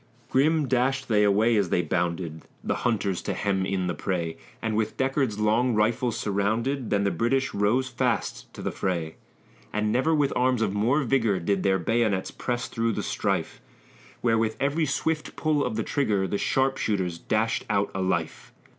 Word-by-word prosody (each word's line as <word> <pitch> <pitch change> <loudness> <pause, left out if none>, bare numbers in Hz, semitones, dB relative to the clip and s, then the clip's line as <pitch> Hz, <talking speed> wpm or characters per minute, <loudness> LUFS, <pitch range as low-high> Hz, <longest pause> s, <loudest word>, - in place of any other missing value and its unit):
Grim 150 +2 +3
dashed 130 +1 +1
they 105 -2 +4
away 105 +3 +3
as 100 -4 +2
they 90 - +2
bounded, 85 -2 -2 0.2
The - - -1
hunters 100 -6 0
to - - -3
hem 95 -2 0
in 95 -1 -1
the 90 - -1
prey, 85 -4 -2 0.2
And, 110 -1 -2
with 110 0 -1
Deckard's 130 -4 0
long 110 +3 +2
rifles 115 +2 +1
surrounded, 110 +6 -1
Then 100 -1 +2
the 100 - +1
British 130 +3 0
rose 110 +6 +2
fast 120 -2 -2
to - - -8
the - - -1
fray; 85 -4 -2 0.5
And 105 0 0
never 155 +7 +2
with 145 -2 +1
arms 125 -2 +2
of 100 - 0
more 120 +9 +2
vigor 115 -7 +2
Did 95 +2 0
their 95 0 +2
bayonets 105 +1 0
press 125 0 -3
through 115 -1 -1
the - - -3
strife. - - -2 0.6
Where, 115 -2 +2
with 110 -1 0
every 145 +3 +1
swift 160 -1 -1
pull 150 -2 +1
of - - -2
the 110 - -1
trigger, 105 -9 0
The 100 +2 -2
sharpshooters 105 -10 0
dashed 110 +4 0
out 100 0 +1
a 95 - -2
life! 95 0 -2
110 Hz, 180 wpm, -26 LUFS, 100-130 Hz, 0.6 s, they